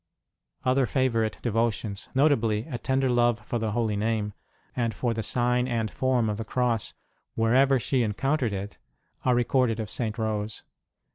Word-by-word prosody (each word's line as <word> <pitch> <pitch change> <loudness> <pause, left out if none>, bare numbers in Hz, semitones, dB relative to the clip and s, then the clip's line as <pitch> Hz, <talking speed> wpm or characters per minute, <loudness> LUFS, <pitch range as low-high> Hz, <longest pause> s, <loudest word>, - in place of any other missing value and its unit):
Other 130 0 +3
favourite 115 -3 +1
devotions, 115 -3 -1
notably 115 -6 +2
a 120 - -5
tender 135 0 +1
love 120 -2 +3
for 120 - -2
the 110 -2 -2
Holy 110 -2 0
Name, 105 0 -1 0.4
and 115 -4 -1
for 120 +1 0
the 110 - -2
sign 125 +2 +1
and 115 -3 -1
form 130 -3 +1
of 105 -1 -1
the 115 - -3
Cross 120 -1 -1 0.4
wherever 130 +4 +4
she 130 +1 0
encountered 125 +3 0
it, 100 +1 -5 0.5
are 125 -1 +4
re 120 - +3
corded 120 -2 +1
of 105 -4 -3
St. 115 -2 -2
Rose. 110 -1 -2
115 Hz, 160 wpm, -27 LUFS, 110-125 Hz, 0.5 s, wherever